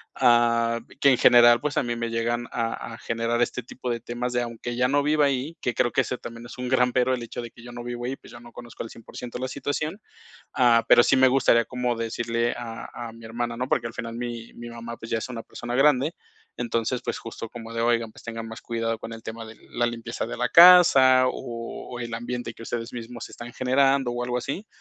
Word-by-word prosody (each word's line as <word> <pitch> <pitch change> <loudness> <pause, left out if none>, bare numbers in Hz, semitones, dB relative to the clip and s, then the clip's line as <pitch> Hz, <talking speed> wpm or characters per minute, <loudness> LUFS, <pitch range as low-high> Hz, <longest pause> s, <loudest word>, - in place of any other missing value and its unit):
Ah, 115 -2 +3 0.2
que 140 - +7
en 130 - +4
general, 120 0 +7
pues, 150 +3 -3
a - - +3
mí 120 -1 -2
me 115 0 -3
llegan 120 +1 -1
a 115 0 -3
a - - -8
generar 115 +1 -1
este 120 +1 -1
tipo 125 +1 -7
de 120 -1 -1
temas 120 +2 -4
de 120 - +1
aunque 120 +1 -5
ya 125 +1 +2
no 145 +2 +2
viva 150 0 +3
ahí, 140 +4 -1
que 125 - -1
creo 120 - +1
que - - +3
eso 125 - -3
también 115 0 -9
es 120 - -10
un 125 0 -4
gran 125 -1 +3
pero, 130 0 +2
el 125 -2 -3
hecho 120 - -6
de 120 - -7
que 120 - -16
yo 120 - -10
no 120 0 -7
vivo 120 0 -5
ahí, 130 +2 -2
pues, - - -16
yo 120 - -11
no 120 0 -14
conozco 120 -1 -8
al 115 - -8
100% 120 +2 -8
la 130 - -2
situación. 145 +7 -3 0.6
Ah, 120 -2 +4
pero, 120 - +8
sí - - +3
me 130 0 +6
gustaría 125 -3 +4
como 125 0 -1
decirle 115 +1 -1
a 115 -2 -7 0.2
a - - -10
mi 115 0 -14
hermana, 115 +1 -3
¿no? 125 +1 -2
Porque, - - +1
al 115 - -6
final 115 0 -5
mi 120 -1 -6
mi 120 0 -9
mamá, 115 0 -7
pues, 115 - -10
ya 115 - +1
es 110 - -5
una 120 -3 -6
persona 120 +1 -6
grande. 145 +3 +3 0.4
Entonces, 120 +1 -1
pues - - -2
justo 115 0 -7
como 115 -1 -9
de: 115 - -1
"Oigan, 115 -1 +1
pues, - - -15
tengan 115 -1 -6
más 115 +1 -8
cuidado 115 -1 -2
con 115 - -8
el 115 0 -9
tema 115 +1 -7
de 110 0 -12
la 120 0 0
limpieza 115 0 -4
de - - -5
la 125 - +1
casa, 165 -8 +8
o 115 -2 -6
o 120 -1 -6
el 120 -1 -5
ambiente 120 0 -4
que - - -12
ustedes 115 0 -4
mismos 120 0 -7
están 120 0 -9
generando 135 +1 +2
o 120 0 -2
algo 125 0 -1
así". 140 - -5
120 Hz, 245 wpm, -25 LUFS, 115-125 Hz, 0.6 s, pero